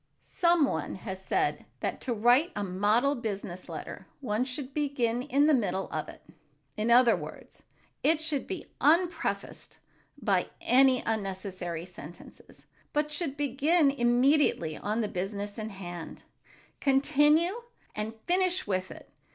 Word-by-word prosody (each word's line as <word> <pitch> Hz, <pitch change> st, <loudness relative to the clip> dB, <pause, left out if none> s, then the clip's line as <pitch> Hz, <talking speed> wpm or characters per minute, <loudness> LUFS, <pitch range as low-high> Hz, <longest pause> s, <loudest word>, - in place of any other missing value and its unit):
Some 340 Hz, -3 st, +3 dB
one 160 Hz, -, -3 dB
has 190 Hz, -1 st, -7 dB
said 380 Hz, -, 0 dB
that -, -, -3 dB
to 255 Hz, -, -3 dB
write 245 Hz, -, +4 dB
a 205 Hz, -, -2 dB
model 210 Hz, +8 st, +2 dB
business 200 Hz, -7 st, -5 dB
letter -, -, -7 dB
one 230 Hz, -3 st, -1 dB
should 260 Hz, +1 st, -5 dB
"begin 255 Hz, -5 st, 0 dB
in 285 Hz, +1 st, +2 dB
the 310 Hz, -, +5 dB
middle 195 Hz, -7 st, 0 dB
of -, -, -3 dB
it." -, -, -13 dB, 0.5 s
In 215 Hz, +2 st, -1 dB
other 240 Hz, 0 st, +6 dB
words, -, -, -10 dB, 0.4 s
it 315 Hz, +1 st, +3 dB
should 315 Hz, -4 st, -1 dB
be 380 Hz, -2 st, -5 dB, 0.2 s
unprefaced 335 Hz, +5 st, 0 dB, 0.4 s
by -, -, +1 dB
any 260 Hz, 0 st, +4 dB
unnecessary 190 Hz, -5 st, -3 dB
sentences, 175 Hz, -2 st, -12 dB, 0.3 s
but 295 Hz, 0 st, 0 dB
should 295 Hz, -2 st, -3 dB
begin 290 Hz, +3 st, +3 dB
immediately 245 Hz, -, +2 dB
on 215 Hz, +7 st, -2 dB
the 215 Hz, -, 0 dB
business 200 Hz, +3 st, -4 dB
in 215 Hz, 0 st, -4 dB
hand, 175 Hz, -4 st, -8 dB, 0.6 s
continue 300 Hz, -, +3 dB, 0.3 s
and 215 Hz, +1 st, -4 dB
finish 370 Hz, +1 st, +2 dB
with 185 Hz, -1 st, -1 dB
it. -, -, -13 dB
245 Hz, 135 wpm, -29 LUFS, 200-295 Hz, 0.6 s, other